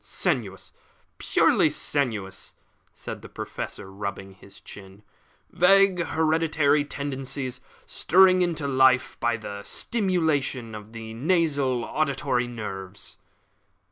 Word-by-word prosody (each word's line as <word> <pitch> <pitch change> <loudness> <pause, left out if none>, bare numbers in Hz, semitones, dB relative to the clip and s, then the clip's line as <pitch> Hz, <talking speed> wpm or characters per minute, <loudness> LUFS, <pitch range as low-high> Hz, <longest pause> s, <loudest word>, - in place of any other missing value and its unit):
"Sensuous 115 - -3 0.5
purely - - +3
sensuous," 110 -9 -2 0.4
said - - -8
the - - -11
Professor, 95 - -6
rubbing 100 0 -6
his 95 +1 -14
chin. 100 0 -13 0.5
"Vague 195 -1 +4
hereditary 155 -3 +2
tendencies 135 -2 -4 0.2
stirred 185 0 +4
into 165 -5 -1
life 130 -1 +3
by 120 -1 +1
the 100 -2 -7
stimulation 155 - -1
of 105 +1 -10
the 110 -1 -8
nasal 140 -3 +1
and - - -10
auditory 140 -4 0
nerves." 100 -4 -7
130 Hz, 105 wpm, -25 LUFS, 110-160 Hz, 0.5 s, Vague